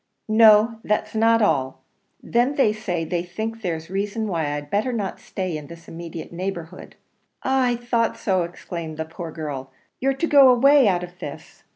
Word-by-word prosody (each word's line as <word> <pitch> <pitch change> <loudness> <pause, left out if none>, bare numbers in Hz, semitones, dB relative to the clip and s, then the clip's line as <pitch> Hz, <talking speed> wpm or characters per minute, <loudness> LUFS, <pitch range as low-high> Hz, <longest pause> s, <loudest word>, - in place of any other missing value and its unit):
"No, 220 +1 +6
that's 210 - -1
not 225 0 +3
all: 130 -7 0 0.4
then 245 +4 +1
they 220 -7 +3
say 180 -6 -3
they 170 +2 -1
think 220 +6 -5
there's 165 -3 -4
reason 205 +3 -2
why 165 -6 -1
I'd 145 0 -6
better 215 +6 +1
not 210 -5 -3
stay 185 -4 -4
in 150 -1 -7
this 170 0 -13
immediate 165 0 -8
neighbourhood." 175 -2 -6 0.5
"Ah! 265 -1 +2
I 245 -1 +1
thought 235 -1 -1
so!" 190 -3 +1
exclaimed 170 -2 -6
the 160 - -3
poor 165 +1 -8
girl; 145 -4 -6 0.3
"you're 270 +1 +1
to 335 - -1
go 280 -4 +7
away 270 +1 +6
out 180 -2 +1
of 180 +1 -10
this!" - - -9
195 Hz, 180 wpm, -23 LUFS, 165-230 Hz, 0.5 s, go